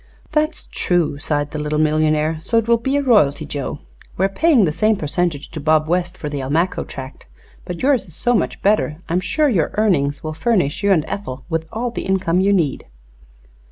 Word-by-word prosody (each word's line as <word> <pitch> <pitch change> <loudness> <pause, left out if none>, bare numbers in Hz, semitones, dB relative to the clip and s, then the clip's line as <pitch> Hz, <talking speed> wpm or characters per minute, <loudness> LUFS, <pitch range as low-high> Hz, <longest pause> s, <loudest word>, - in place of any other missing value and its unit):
"That's 305 +1 0
true," 170 -5 0
sighed 145 -1 -1
the 155 - -4
little 150 0 -1
millionaire. 155 0 +1
"So 230 +7 0
it 225 -1 +1
will 235 -1 +4
be 265 +4 -1
a 285 - 0
royalty, 155 - +3
Joe. 145 0 -5 0.4
We 190 - +2
are - - +1
paying 260 - +3
the 155 - 0
same 215 +7 +2
percentage 160 -2 -2
to 160 - -6
Bob 155 +1 +2
West 175 +1 -1
for 150 - -5
the 145 -1 -3
Almaquo 160 +7 0
tract, 130 0 -9 0.4
but 180 +4 -6
yours 265 -7 +2
is 170 - -7
so 245 - +1
much 215 - -1
better 205 -3 +3
that 160 - -21
I - - -1
am 180 - +3
sure 295 +12 +1
your 185 - +1
earnings 145 -10 +1
will 155 0 -4
furnish 175 -3 0
you 200 -1 +2
and 160 -5 +3
Ethel 130 -10 -6
with 160 -1 -2
all 235 +2 -2
the - - -5
income 185 -2 +1
you 200 +1 +3
need." 165 -9 0
170 Hz, 215 wpm, -20 LUFS, 150-210 Hz, 0.4 s, will